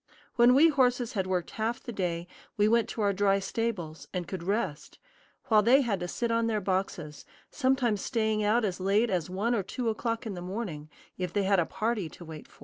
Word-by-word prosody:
When 245 +1 +6
we 320 +4 +7
horses 250 -4 +1
had 190 -4 -1
worked 180 -3 -1
half 225 +2 -2
the 240 - -6
day 175 -4 -2 0.3
we 210 0 +4
went 230 0 +2
to 225 - -4
our 200 -1 +2
dry 195 0 +3
stables, 195 -5 -3
and 180 -2 -4
could 190 -3 -5
rest; 185 -4 -3 0.5
while 215 -2 +6
they 250 +6 +5
had 220 -7 -1
to 180 - -3
sit 235 +6 -2
on 230 0 +1
their 220 -2 0
boxes, 185 -6 -3 0.3
sometimes 255 -6 +1
staying 220 -3 0
out 220 +2 +2
as 190 -3 -3
late 200 +4 +2
as 180 -3 -1
one 205 +6 0
or 225 - +1
two 230 +5 -3
o'clock 230 +2 -2
in 215 - -4
the 175 - -6
morning, 180 -6 -5 0.3
if 180 -2 -2
they 205 +1 0
had 195 0 +3
a 165 - +1
party 215 -4 -2
to 170 - -12
wait 155 -2 -9
for. - - -23
205 Hz, 220 wpm, -29 LUFS, 185-230 Hz, 0.5 s, we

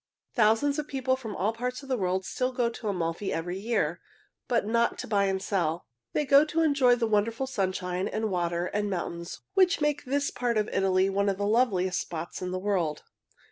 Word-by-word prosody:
Thousands 240 +6 +3
of 300 - -3
people 260 -2 0
from 225 -6 -7
all 210 +4 0
parts 250 +4 -4
of - - -11
the 260 - +1
world 185 -3 -1
still 255 0 -1
go 245 -2 0
to 230 - -7
Amalfi 180 0 -2
every 175 +3 -3
year, 230 +3 -1 0.5
but 235 -4 +1
not 235 +2 +1
to - - -6
buy 200 -2 +2
and 190 -1 0
sell. 175 -4 -1 0.3
They 300 - +1
go 280 +1 +7
to 320 +2 0
enjoy 280 -5 +4
the 235 -1 0
wonderful 225 +4 +1
sunshine 185 -5 -2
and 215 0 -2
water 175 -1 0
and 205 +2 -1
mountains 170 -2 -4
which 380 0 +4
make 295 -1 0
this 280 +2 0
part 240 -2 -1
of 210 0 +1
Italy 190 0 +2
one 200 +1 +1
of 195 - -1
the 205 - -1
loveliest 205 -5 +2
spots 170 +1 -6
in 180 - -3
the 185 - -2
world. 185 -6 -1
210 Hz, 205 wpm, -28 LUFS, 185-250 Hz, 0.5 s, go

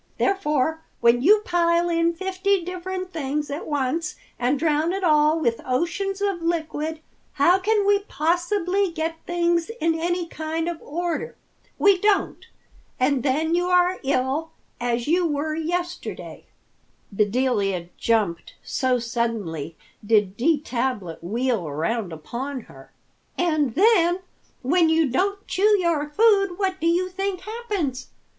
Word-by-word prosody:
Therefore 320 -5 0 0.2
when 235 +1 +4
you 415 +8 +5
pile 340 -4 +2
in 335 0 +1
fifty 380 0 0
different 370 +1 -5
things 295 -1 -2
at 290 +4 -5
once 295 +2 -1 0.2
and 250 +4 +1
drown 310 +3 +1
it 390 0 -3
all 305 -1 +4
with 235 -7 0
oceans 345 +9 -1
of 395 -4 -1
liquid, 320 -2 -2 0.3
how 350 +7 +4
can 415 +1 +1
we 405 0 +4
possibly 360 +3 0
get 325 0 -3
things 345 0 +1
in 330 0 +2
any 345 +2 -1
kind 320 0 -3
of 340 -2 -4
order? 345 +8 -3 0.4
We 400 -2 +4
don't, 415 +1 +1 0.5
and 260 +1 +2
then 300 +5 0
you 355 +1 +1
are 360 0 +3
ill, 275 +4 -1 0.3
as 240 0 -1
you 345 +2 +3
were 305 +1 -1
yesterday." 350 +3 -4 0.6
Bedelia 205 -4 0
jumped, 210 -7 0
so 255 -1 0
suddenly 225 - -3 0.3
did 205 -3 +2
D. 295 +6 +2
Tablet 235 - -3
wheel 225 -1 -1
around 175 +7 -2
upon 245 - -5
her. 135 -9 -16 0.5
"And 310 -8 +1
then 365 -3 +4 0.4
when 330 +5 +3
you 320 -4 +2
don't 400 +8 0
chew 415 +2 +3
your 325 -4 0
food, 395 +1 +3
what 380 -2 -1
do 330 - +1
you 350 +2 +2
think 380 0 -3
happens? 410 - -3
320 Hz, 135 wpm, -23 LUFS, 260-360 Hz, 0.6 s, you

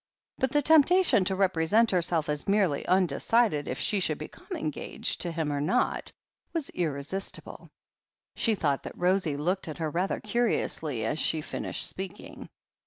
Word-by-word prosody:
But 265 -1 +1
the 295 0 +2
temptation 315 - +5
to 190 - 0
represent 190 +4 +3
herself 170 -3 +1
as 150 -1 -3
merely 195 -8 +2
undecided 185 0 +2
if - - -3
she 205 - 0
should 155 -5 0
become 155 - -11
engaged 155 -2 -2
to 175 - 0
him 160 -3 -2
or 140 - -1
not, 240 +12 0 0.4
was 325 -5 -3
irresistible. 165 +3 -4 0.7
She 225 -2 +2
thought 145 -7 0
that - - -9
Rosie 180 -5 +1
looked 180 +6 -1
at 155 - -6
her 160 -2 -2
rather 180 +4 -1
curiously 180 - -1
as 150 +8 -1
she 160 - 0
finished - - -3
speaking. 190 +1 -7
180 Hz, 155 wpm, -28 LUFS, 155-210 Hz, 0.7 s, temptation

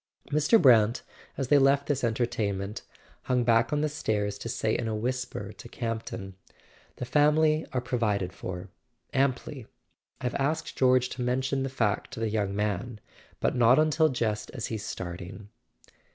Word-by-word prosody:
Mr. 150 +10 +4
Brant, 115 - +5 0.3
as 135 -3 -2
they 145 - +6
left 140 +1 +4
this 140 -3 -1
entertainment, 110 -4 -1 0.4
hung 125 -1 +1
back 115 0 +3
on 150 0 +1
the 155 - +2
stairs 105 -8 -2
to 115 - -5
say 110 -2 0
in 115 - -2
a 110 - -1
whisper 120 -3 -3
to 120 - -12
Campton: 115 -5 -5 0.6
"The - - -5
family 155 +3 +3
are 125 - -1
provided 105 -7 -1
for—amply. 120 +7 -4 0.5
I've 125 0 -2
asked 155 +4 -1
George 130 -1 +3
to 130 - -6
mention 130 +2 0
the 135 - -1
fact 115 -6 -1
to 120 - -6
the 115 -1 0
young 100 -2 -1
man; 105 +2 -2 0.4
but - - 0
not 125 +1 +5
until 155 +1 +3
just 115 -5 -2
as 120 - -3
he's 105 -2 -4
starting." 90 +2 -7
120 Hz, 155 wpm, -28 LUFS, 105-135 Hz, 0.6 s, they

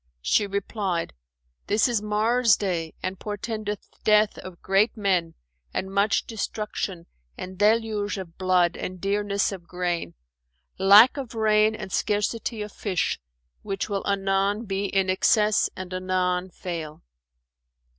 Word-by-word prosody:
She 205 - +2
replied, 195 - -2 0.5
"That 210 +3 +3
is 235 -4 0
Mars' 220 +2 +3
day 170 -5 -2
and 185 0 -3
portendeth 210 0 -4 0.2
death 215 0 +3
of 185 -2 -10
great 200 +5 +2
men 185 -5 0 0.4
and 190 0 -3
much 200 +2 +2
destruction 210 -5 -4 0.3
and 185 +1 -7
deluge 210 0 +1
of 180 -3 -8
blood 180 -2 +2
and 185 0 -6
dearness 200 +1 0
of 180 -3 -8
grain; 175 - -3 0.6
lack 205 +8 +8
of 255 -4 -6
rain 215 0 +3
and 190 - -7
scarcity 210 +2 -1
of 210 - -8
fish, 190 -4 -1 0.4
which 195 0 -3
will 200 -1 -1
anon 200 +2 +1
be 195 0 -2
in 195 -1 +1
excess 210 +3 +3
and 185 -1 -7
anon 185 0 0
fail. 165 -4 -6
200 Hz, 130 wpm, -25 LUFS, 185-210 Hz, 0.6 s, lack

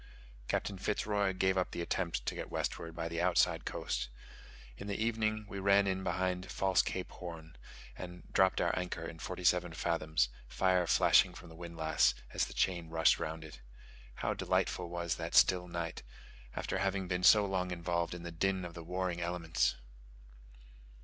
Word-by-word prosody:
Captain 100 -2 -1
Fitz 105 +2 -1
Roy 100 -2 +1
gave 95 0 +2
up 90 - 0
the - - -4
attempt 85 -9 -2
to - - -1
get - - -6
westward 80 -1 -3
by 85 0 -3
the 85 0 -2
outside - - +3
coast. - - -2 0.7
In 100 - -8
the 100 - -2
evening 110 -1 0
we 100 -1 -6
ran 100 +1 +4
in 95 -1 -1
behind 90 0 -1
False 95 -2 +3
Cape 95 - -4
Horn, 80 -3 -9 0.4
and 90 0 -8
dropped 95 0 +4
our - - +1
anchor 90 -2 -3
in 80 -1 -7
forty 90 +2 -5
seven 90 -1 +3
fathoms, 80 -5 +1 0.2
fire 90 -2 +2
flashing - - +5
from 90 - -11
the 80 - -12
windlass 85 -2 +1 0.2
as - - +2
the - - -9
chain 85 -3 0
rushed 80 0 +4
round 80 0 -4
it. 75 -4 -11 0.5
How - - -1
delightful 90 -1 0
was 85 -1 -2
that - - -4
still 90 -1 +5
night, 85 -1 -4 0.5
after 95 - -2
having 95 -1 0
been 90 0 -1
so 105 +3 +7
long 95 -2 -1
involved 85 0 -1
in 85 - -8
the 85 - -5
din 95 +2 0
of 85 - -7
the 85 - -8
warring 90 0 -2
elements! 85 -1 0
90 Hz, 175 wpm, -33 LUFS, 85-95 Hz, 0.7 s, so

